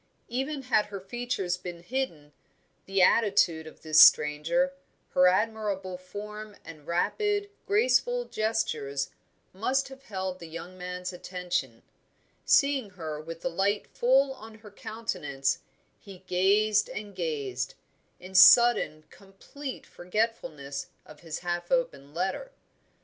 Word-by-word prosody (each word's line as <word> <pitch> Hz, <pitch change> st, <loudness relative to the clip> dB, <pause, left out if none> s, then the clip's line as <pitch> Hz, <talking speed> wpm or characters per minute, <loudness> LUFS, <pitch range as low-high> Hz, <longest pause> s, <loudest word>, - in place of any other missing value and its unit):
Even 270 Hz, +4 st, -3 dB
had 215 Hz, -5 st, +2 dB
her 200 Hz, -1 st, -6 dB
features 195 Hz, -3 st, -3 dB
been 175 Hz, -1 st, -8 dB
hidden, 175 Hz, -, -4 dB, 0.5 s
the 195 Hz, -1 st, +3 dB
attitude 180 Hz, -7 st, +3 dB
of -, -, -14 dB
this 155 Hz, -1 st, +6 dB
stranger, 160 Hz, -, +5 dB, 0.4 s
her 180 Hz, 0 st, +5 dB
admirable 195 Hz, -1 st, 0 dB
form 210 Hz, +3 st, -8 dB
and 155 Hz, -2 st, -12 dB
rapid, 410 Hz, -, 0 dB, 0.2 s
graceful -, -, +2 dB
gestures, 180 Hz, -, -2 dB, 0.4 s
must 265 Hz, +7 st, 0 dB
have 265 Hz, 0 st, -12 dB
held 190 Hz, -2 st, -4 dB
the 170 Hz, -, -9 dB
young 170 Hz, +3 st, -8 dB
man's 180 Hz, 0 st, -5 dB
attention; 175 Hz, -10 st, -4 dB, 0.6 s
seeing 275 Hz, -6 st, +3 dB
her 160 Hz, -5 st, -6 dB
with 165 Hz, +1 st, -8 dB
the -, -, -1 dB
light 200 Hz, +4 st, 0 dB
full 265 Hz, +2 st, +2 dB
on 220 Hz, -3 st, -12 dB
her 215 Hz, -1 st, -14 dB
countenance, 150 Hz, -12 st, -3 dB, 0.4 s
he 190 Hz, -2 st, -13 dB
gazed 205 Hz, +4 st, +3 dB
and 205 Hz, -1 st, -7 dB
gazed, 140 Hz, -7 st, -3 dB, 0.4 s
in 185 Hz, +1 st, -11 dB
sudden 190 Hz, -5 st, +7 dB
complete 230 Hz, +8 st, -9 dB
forgetfulness 175 Hz, -8 st, -3 dB, 0.2 s
of 155 Hz, -, -14 dB
his 165 Hz, -2 st, -6 dB
half 175 Hz, 0 st, -3 dB
opened 155 Hz, -, -1 dB
letter. 190 Hz, -, -2 dB
190 Hz, 120 wpm, -28 LUFS, 170-230 Hz, 0.6 s, sudden